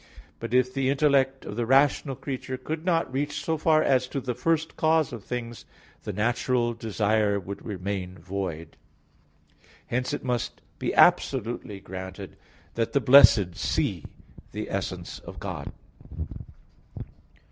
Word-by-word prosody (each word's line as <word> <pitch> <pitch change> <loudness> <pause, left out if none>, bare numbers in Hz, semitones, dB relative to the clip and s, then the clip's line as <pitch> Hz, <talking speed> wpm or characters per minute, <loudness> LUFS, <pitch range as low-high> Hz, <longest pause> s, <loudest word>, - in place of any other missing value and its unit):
But - - -5
if 125 0 +3
the 135 -1 0
intellect 135 -2 +2
of 105 - -6
the 120 +1 -1
rational 135 +1 +3
creature 130 -1 -5
could 155 +5 -5
not 165 -6 +1
reach 145 +2 -1
so 160 - +1
far 155 0 +3
as 130 -2 +2
to 140 - -3
the 125 -1 -3
first 160 +6 0
cause 160 -3 +2
of 115 -4 -7
things, 120 -1 -5 0.4
the - - -2
natural 120 +3 0
desire 110 -2 +1
would 100 +1 -8
remain 95 -2 -4
void. 85 -2 -5 1.1
Hence 125 +1 -1
it - - -3
must 125 -3 -2 0.2
be - - -1
absolutely 110 -2 +3
granted 95 0 -8 0.4
that 115 -1 -1
the 140 - +4
blessed 125 -9 +7
see - - -1 0.5
the - - -5
essence - - -4
of - - -10
God. - - -5
125 Hz, 135 wpm, -26 LUFS, 105-135 Hz, 1.1 s, blessed